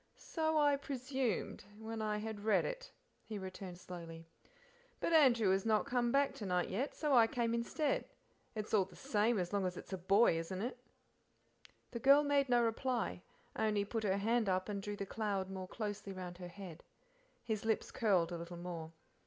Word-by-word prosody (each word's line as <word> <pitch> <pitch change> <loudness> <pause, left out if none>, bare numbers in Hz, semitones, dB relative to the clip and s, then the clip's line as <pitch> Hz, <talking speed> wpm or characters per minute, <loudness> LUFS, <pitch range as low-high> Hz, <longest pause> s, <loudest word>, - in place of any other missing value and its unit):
"So 315 -1 -1
I 290 -2 +4
presumed 260 -4 -2
when 220 0 -5
I 210 -1 0
had 210 -1 -5
read 215 0 +3
it," - - -5 0.3
he 215 - -6
returned 185 -1 -7
slowly; 165 -2 -8 0.7
"but 335 - 0
Andrew 240 -10 +6
has 190 0 +2
not 215 -2 +2
come 240 -1 +1
back 280 +1 +3
to 210 - -7
night 180 -1 +1
yet, 250 +9 -2
so 300 -3 0
I 235 -3 +7
came 230 0 0
instead; 255 +5 0 0.5
it's 215 0 -4
all 200 -3 +5
the 180 -1 -16
same 230 -3 +1
as 180 0 -2
long 200 -1 +1
as 180 -1 -2
it's - - -8
a 190 - -3
boy, 195 -1 +4
isn't 175 +3 -4
it?" 245 +1 -4 1.1
The 235 - -4
girl 275 +4 +7
made 285 -2 +2
no 240 -1 +4
reply, 235 -3 -1 0.3
only 210 -2 +1
put 225 +2 -3
her 195 -2 +2
hand 220 +1 +1
up 185 +2 0
and 200 -1 -2
drew 205 +1 -4
the 200 - -4
cloud 195 -2 -2
more 190 -1 -5
closely 205 -1 -4
round 180 -1 -7
her 180 - -6
head. 175 -2 -10 0.6
His 220 -1 -2
lips 220 0 0
curled 185 -7 +2
a 170 - -4
little 170 +1 -7
more. 170 -2 -6
210 Hz, 190 wpm, -36 LUFS, 185-240 Hz, 1.1 s, I